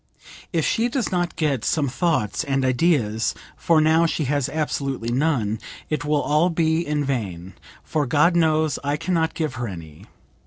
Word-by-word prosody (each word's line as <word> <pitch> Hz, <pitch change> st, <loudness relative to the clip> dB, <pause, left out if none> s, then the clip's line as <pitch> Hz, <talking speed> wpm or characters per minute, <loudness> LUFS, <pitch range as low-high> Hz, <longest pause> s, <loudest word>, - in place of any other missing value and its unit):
"If 165 Hz, -5 st, 0 dB
she 235 Hz, +2 st, +1 dB
does 250 Hz, -2 st, -2 dB
not 175 Hz, -1 st, -1 dB
get 140 Hz, -8 st, 0 dB
some 150 Hz, -3 st, +1 dB
thoughts 125 Hz, -, 0 dB
and 135 Hz, -3 st, 0 dB
ideas 125 Hz, -5 st, +1 dB, 0.2 s
(for 165 Hz, -2 st, +2 dB
now 160 Hz, +2 st, +4 dB
she 160 Hz, -, -1 dB
has 140 Hz, -1 st, 0 dB
absolutely 140 Hz, -6 st, -2 dB
none), 120 Hz, -6 st, 0 dB, 0.3 s
it 155 Hz, -, -1 dB
will 150 Hz, 0 st, +1 dB
all 155 Hz, +4 st, +2 dB
be 160 Hz, -1 st, +1 dB
in 150 Hz, -2 st, -1 dB
vain, 95 Hz, -9 st, -4 dB, 0.3 s
for 150 Hz, -3 st, -1 dB
God 150 Hz, +7 st, +3 dB
knows, 155 Hz, -2 st, +2 dB
I 145 Hz, +1 st, 0 dB
can 185 Hz, -, -2 dB
not 160 Hz, -1 st, 0 dB
give 155 Hz, -6 st, -2 dB
her 120 Hz, -, -2 dB
any. 80 Hz, -6 st, -10 dB
150 Hz, 170 wpm, -23 LUFS, 125-160 Hz, 0.3 s, now